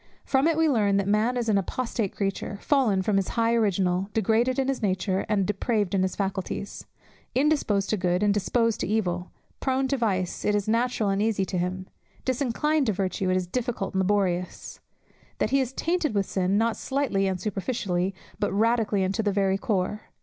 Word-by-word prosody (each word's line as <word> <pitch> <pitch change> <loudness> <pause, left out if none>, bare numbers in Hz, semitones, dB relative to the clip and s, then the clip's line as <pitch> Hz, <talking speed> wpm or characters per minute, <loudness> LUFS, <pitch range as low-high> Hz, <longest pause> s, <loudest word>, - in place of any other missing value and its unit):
From 270 +3 +2
it 330 -2 +2
we 325 0 +4
learn 210 -8 +2
that 200 -1 0
man 215 +5 +2
is 240 -1 -1
an 205 -2 +3
apostate 225 0 -3
creature, 200 0 -2
fallen 230 -10 +2
from 200 0 +1
his 195 - +1
high 230 0 +3
original, 195 -4 +1
degraded 225 +4 +2
in 270 -1 +1
his 270 -2 -1
nature, 190 -1 0
and 205 -3 +2
depraved 210 0 0
in 195 - +2
his 185 0 0
faculties; 195 0 -4 0.5
indisposed 260 -8 +2
to 215 - +1
good, 180 +1 +1
and 205 -1 +4
disposed 230 +3 +1
to - - -2
evil; 180 -4 -1 0.3
prone 265 0 0
to 275 - +1
vice, 190 -7 -1
it 210 - +2
is 205 -1 -1
natural 230 -1 +1
and 195 +1 +1
easy 210 -3 +1
to 185 - -5
him; 185 +1 -2 0.4
disinclined 270 +3 +1
to 215 - +2
virtue, 190 0 -1
it 185 - +2
is 185 - -1
difficult 230 0 -3
and 190 - 0
laborious; 185 -2 -1 0.6
that - - 0
he 275 - +4
is 255 -1 -2
tainted 320 -3 -1
with 200 -1 +2
sin, 190 +1 0
not 225 +1 +2
slightly 265 -8 0
and 190 -1 -1
superficially, 195 -2 -2 0.2
but - - 0
radically 220 -1 +2
and 190 +1 0
to 225 - 0
the 210 -2 +1
very 195 -1 +2
core. 210 -2 -1
205 Hz, 195 wpm, -26 LUFS, 190-235 Hz, 0.6 s, we